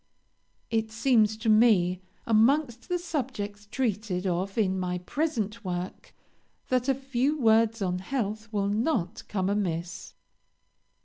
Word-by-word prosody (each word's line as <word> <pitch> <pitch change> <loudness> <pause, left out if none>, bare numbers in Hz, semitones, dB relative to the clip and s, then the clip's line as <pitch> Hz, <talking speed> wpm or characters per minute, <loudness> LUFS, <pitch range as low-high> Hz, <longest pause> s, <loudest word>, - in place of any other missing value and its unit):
It 225 -1 0
seems 220 -2 +3
to 225 +1 -5
me, 210 -5 +4 0.2
amongst 240 +4 +2
the 360 - +1
subjects 250 - -4
treated 210 -7 -1
of 185 +3 -1
in 190 -4 +1
my 180 -1 -1
present 230 - -2
work, 180 0 -5 0.5
that 255 +1 +1
a 270 - +3
few 270 +3 -1
words 225 -2 +3
on 180 -1 -1
health 215 0 -3
will 200 -2 0
not 215 - 0
come 190 -3 -1
amiss. 180 -4 -2
215 Hz, 125 wpm, -28 LUFS, 190-245 Hz, 0.5 s, me